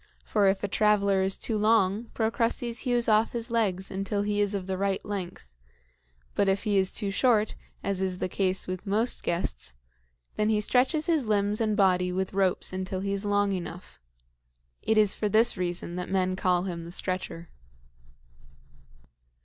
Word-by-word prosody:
For 205 -2 +2
if 195 +1 +1
a - - +1
traveler 200 -1 +2
is 190 0 +1
too 225 - -1
long, 215 0 +2
Procrustes 230 +1 0
hews 245 -3 0
off 220 0 +3
his 235 0 -3
legs 195 -5 0
until 195 +1 -2
he 205 0 0
is 205 0 0
of 190 -2 -3
the 190 0 -2
right 195 0 -1
length; 180 - -6 0.8
but 195 - +2
if 195 0 0
he 205 -3 +2
is 190 -1 +1
too 205 -3 -1
short, 220 -1 +2 0.3
as 195 -1 -1
is 185 -1 -1
the 185 - -2
case 190 0 +1
with 185 +2 -6
most 220 +5 +1
guests, 60 - -2 0.6
then 215 0 +1
he 215 -1 +2
stretches 260 +8 +2
his 315 -8 +1
limbs 210 0 +1
and 215 -2 0
body 180 -2 +3
with 190 +1 -2
ropes 190 -1 +1
until 185 0 -3
he 200 0 -2
is 200 +1 -2
long 205 0 +1
enough. 180 -1 -6 0.8
It 220 - +1
is 210 -2 +4
for 210 - -2
this 225 +3 +4
reason 175 -1 -3
that 180 - -4
men 185 -1 0
call 180 -1 +1
him 175 -3 -5
the 170 - -9
Stretcher." 185 -2 -3
200 Hz, 175 wpm, -27 LUFS, 185-215 Hz, 0.8 s, is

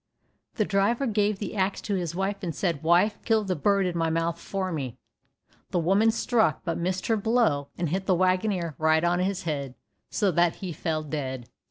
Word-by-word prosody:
The 215 - +1
driver 210 +7 +1
gave 210 -3 +1
the 205 +1 -5
axe 195 0 0
to 205 - -3
his 175 -3 -2
wife, 195 +2 -2
and 170 -6 -4
said, 170 -5 -1
"Wife, 175 +6 +3
kill 220 -2 +2
the 190 -2 -1
bird 200 +4 +2
in 180 -1 -2
my 165 -1 +1
mouth 165 +1 -1
for 190 -2 -3
me." 135 -7 -4 0.7
The - - -1
woman 195 +6 +3
struck, 225 0 +1
but 170 - -2
missed 185 +1 -2
her 225 - +2
blow, 210 - +1
and 170 -3 -1
hit 190 +4 -2
the 185 - +4
waggoner 185 -1 +1
right 160 +1 +3
on 175 +1 +2
his 190 +1 -1
head, 140 -5 -3 0.3
so 205 -4 +1
that 170 0 +2
he 185 -3 -6
fell 155 0 -2
dead. 130 -5 -4
185 Hz, 200 wpm, -26 LUFS, 165-200 Hz, 0.7 s, the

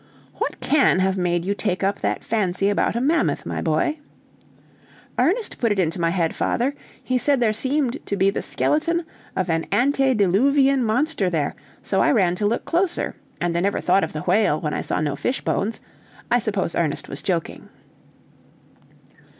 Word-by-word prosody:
"What - - -3
can 280 -9 +3
have 190 0 +1
made 175 -2 0
you 200 - +1
take 200 -2 -2
up 200 +1 0
that - - -2
fancy 200 -3 0
about 205 - +1
a - - +1
mammoth, 305 +7 +1
my - - -3
boy?" 310 0 0 1.2
"Ernest 380 - +1
put 230 -3 +1
it 205 - 0
into 170 -1 0
my 165 - +2
head, 170 -2 0
father. 255 +4 0 0.3
He 255 0 0
said 275 +2 +2
there 225 -3 +2
seemed 265 +3 -1
to 200 - -1
be 195 +1 +3
the - - -3
skeleton 335 +3 0 0.3
of 185 - 0
an 165 -1 -1
antediluvian 265 +1 +3
monster 230 - +1
there, 155 -5 -1 0.3
so - - +1
I - - +4
ran 185 -7 +3
to 205 - +1
look 230 - -1
closer, 345 +1 0 0.2
and 170 -1 -1
I - - +2
never 200 +3 0
thought 190 +2 +2
of 160 - -3
the 150 - -4
whale, 180 -4 +2
when 150 -2 -3
I - - -1
saw - - -1
no 150 -2 -1
fish 260 - -2
bones. 215 +4 -1 0.5
I 240 - +5
suppose 205 -6 -2
Ernest 155 -4 -1
was 140 - -7
joking." 170 -2 -3
205 Hz, 180 wpm, -22 LUFS, 180-265 Hz, 1.2 s, I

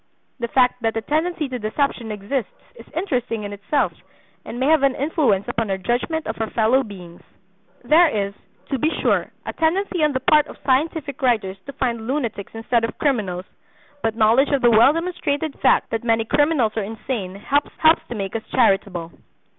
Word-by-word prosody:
The 235 - -2
fact 250 0 +2
that 225 0 0
a - - -1
tendency 315 +5 -1
to 255 -2 -5
deception 230 +1 -1
exists 210 +5 -3 0.2
is - - -14
interesting 245 - -2
in 205 0 -5
itself, 210 +8 0 0.5
and 240 - -7
may 260 - +1
have 310 0 +4
an 275 -1 +3
influence 270 - +1
upon 225 -2 -2
our 195 - 0
judgment 245 - -1
of 220 - -4
our 220 - -1
fellow 235 +4 +3
beings. 180 -7 -10 0.6
There 315 +8 +6
is, 200 -4 -2 0.4
to 270 - 0
be 310 - +2
sure, - - +2 0.2
a - - -4
tendency 350 +1 0
on 300 -1 +2
the 260 - 0
part 300 +3 +4
of - - -11
scientific 285 +1 0
writers 215 -7 +1
to 280 - -7
find 235 -4 -2
lunatics 240 -7 -3
instead 225 +1 0
of 230 - -3
criminals; 200 -11 -1 0.6
but 225 -1 -1
knowledge 230 +5 +4
of 280 -3 0
the 240 - +6
well 230 +5 +7
demonstrated 320 -3 -2
fact - - +3
that 225 0 -2
many 225 -1 +1
criminals 290 -4 +2
are - - +1
insane 210 -2 -5
helps 280 +9 0 0.4
to 240 - -5
make 195 0 -4
us 225 - -1
charitable. 195 -8 +1
240 Hz, 185 wpm, -21 LUFS, 215-285 Hz, 0.6 s, well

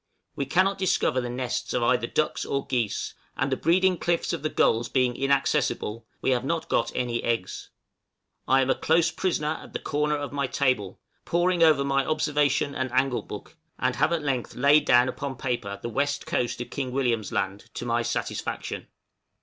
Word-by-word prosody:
We 140 - -2
cannot 190 +6 +2
discover 170 -8 +1
the 120 - -4
nests 125 0 -3
of 125 - +1
either 120 -1 +2
ducks 155 - 0
or 140 0 -2
geese, 120 -6 -1 0.2
and 135 +1 0
the - - +3
breeding 180 +4 +2
cliffs 170 0 0
of 165 - -3
the 155 - -1
gulls 115 -5 +2
being 125 -2 +1
inaccessible, 135 -4 0
we - - +1
have 125 -1 +1
not 160 +3 -2
got - - +1
any 120 -1 -1
eggs. 115 -6 -2 0.8
I 135 0 +5
am 130 0 +2
a - - +5
close 165 +1 +2
prisoner 160 -4 -1
at - - -13
the - - -2
corner 150 0 0
of 145 -1 -5
my 140 -1 0
table, 130 -9 0 0.2
poring 175 +1 +1
over 155 -4 +5
my 135 0 +1
observation 150 -2 +1
and 130 -2 -2
angle 130 0 +1
book, - - -10 0.2
and - - 0
have 160 - +2
at 165 -3 0
length 135 -4 -2
laid 145 +3 +5
down 120 +1 +5
upon 135 +1 -4
paper 120 -6 -3
the - - -5
west 140 +5 -1
coast 120 -1 -1
of 120 - -7
King 130 -3 -3
William's 120 -6 0
Land 100 +3 -2
to - - -4
my 120 0 +1
satisfaction. 115 - -3
135 Hz, 190 wpm, -26 LUFS, 120-150 Hz, 0.8 s, I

